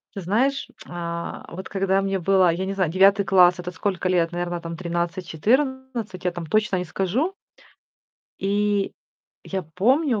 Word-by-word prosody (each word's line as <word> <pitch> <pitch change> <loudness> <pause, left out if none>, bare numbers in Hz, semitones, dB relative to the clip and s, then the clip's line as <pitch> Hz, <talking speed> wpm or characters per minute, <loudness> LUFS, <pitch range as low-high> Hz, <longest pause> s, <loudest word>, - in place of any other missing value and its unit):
Ты 195 - -5
знаешь, 255 +10 +1 0.2
а, 170 -1 -5
вот 185 +2 -7
когда 195 0 +1
мне 195 0 0
было, 185 0 +4
я 185 +3 -2
не 195 - -2
знаю, 185 -5 0
9 195 +2 +5
класс- 180 -2 +5
это 180 - -5
сколько 185 0 -2
лет? 170 -2 +2
Наверно 175 0 -3
там 165 0 -6
13-14, 190 - -1
я 180 - +1
там 175 -2 -6
точно 210 +1 +1
не 180 - -2
скажу. 215 - -1 1.1
И 205 0 +1 0.5
я 190 -1 -3
помню, 225 - +1
190 Hz, 155 wpm, -24 LUFS, 175-205 Hz, 1.1 s, 9